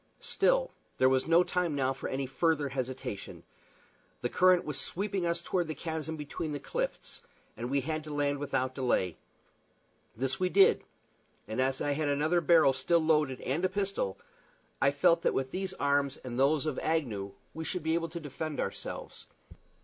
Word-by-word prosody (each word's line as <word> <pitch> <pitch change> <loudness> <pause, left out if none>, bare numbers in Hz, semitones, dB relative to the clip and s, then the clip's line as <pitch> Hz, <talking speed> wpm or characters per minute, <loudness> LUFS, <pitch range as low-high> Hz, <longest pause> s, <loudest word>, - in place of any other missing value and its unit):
Still, - - +1 0.3
there 130 - +5
was 130 +1 +1
no 170 +2 +6
time 180 -4 -1
now 135 -1 +1
for 135 - -5
any 135 +1 -2
further 150 +2 +1
hesitation. 130 -5 -5 0.8
The 120 - -1
current 185 +3 +4
was 150 -2 -1
sweeping 195 -1 -1
us 170 0 0
toward 175 -1 -1
the 155 - -4
chasm 160 -1 -4
between 150 +1 -4
the 145 - -3
cliffs, - - -4 0.3
and 120 +1 -4
we 140 +1 +1
had 155 +3 -3
to - - -8
land 145 -1 0
without 130 -2 -1
delay. 120 - 0 1.0
This 130 +2 -1
we 185 0 +1
did, 195 +1 +5 0.6
and 110 +4 -1
as 135 +1 0
I 145 - 0
had 150 +1 0
another 155 +5 +2
barrel 160 -4 +5
still 170 +5 +2
loaded 150 -5 +2
and 145 +7 -1
a 185 - +3
pistol, 195 - -2 0.6
I 140 - +5
felt 165 +4 +3
that - - +1
with 130 0 -1
these 190 0 -3
arms 140 -2 +1
and 125 -1 -5
those 140 +2 +3
of 155 -4 -1
Agnew 110 -12 -1 0.2
we 160 - -5
should 175 +2 -3
be 160 0 +1
able 165 0 0
to 170 +2 -6
defend 150 0 -5
ourselves. - - -5
150 Hz, 180 wpm, -30 LUFS, 135-170 Hz, 1.0 s, no